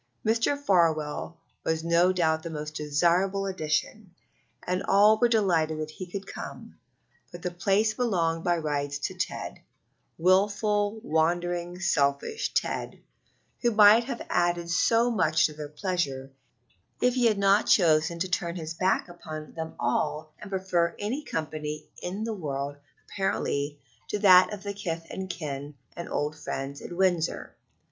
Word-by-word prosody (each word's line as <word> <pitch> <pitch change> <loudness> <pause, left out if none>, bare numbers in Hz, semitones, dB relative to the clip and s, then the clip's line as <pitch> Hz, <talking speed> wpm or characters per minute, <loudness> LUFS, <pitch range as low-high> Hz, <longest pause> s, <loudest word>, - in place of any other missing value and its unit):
Mr. 230 +6 +2
Farwell 165 - +1 0.3
was 160 0 -1
no 170 +2 +4
doubt 160 -3 +1
a - - -5
most 150 -1 -5
desirable 175 +7 +1
addition, 180 +2 -2 0.5
and 180 +1 -1
all 210 +2 +5
were 240 - +5
delighted 175 -9 +2
that 155 0 -4
he 185 +3 -8
could 195 +2 -6
come; - - -9 0.6
but 175 0 -10
the 180 - -2
place 200 +5 +1
belonged 170 -9 0
by 175 -1 +2
rights 145 -2 -2
to 145 - -3
Ted - - -4 0.6
wilful, 205 +4 +2
wandering, 175 +1 0
selfish 140 - 0
Ted, - - -1 0.6
who 240 - +3
might 215 +1 +7
have 245 -2 -5
added 175 -1 0
so 230 +6 +3
much 160 -7 +3
to 155 - -1
their 150 -1 -7
pleasure 150 -6 -2 0.7
if 250 0 +3
he 245 -2 +3
had 215 -2 +2
not 200 +1 +3
chosen 165 -2 +4
to 180 +3 -1
turn 175 -2 -2
his 160 -2 -5
back 185 +3 +1
upon 155 -3 -9
them 160 -1 -6
all 150 +5 -1
and 210 - -9
prefer 185 -3 0
any 245 +9 -3
company 155 - -4
in 190 +4 -4
the 225 0 -2
world, 140 -6 -4 0.3
apparently, 145 -7 -2 0.3
to - - -2
that 185 -2 +7
of 205 -2 -7
kith 170 -5 -4
and 190 0 -5
kin 145 -4 -5 0.2
and 170 - -6
old 150 +1 -2
friends 140 -2 -5
at - - -8
Windsor. 175 -2 0
175 Hz, 150 wpm, -27 LUFS, 155-200 Hz, 0.7 s, might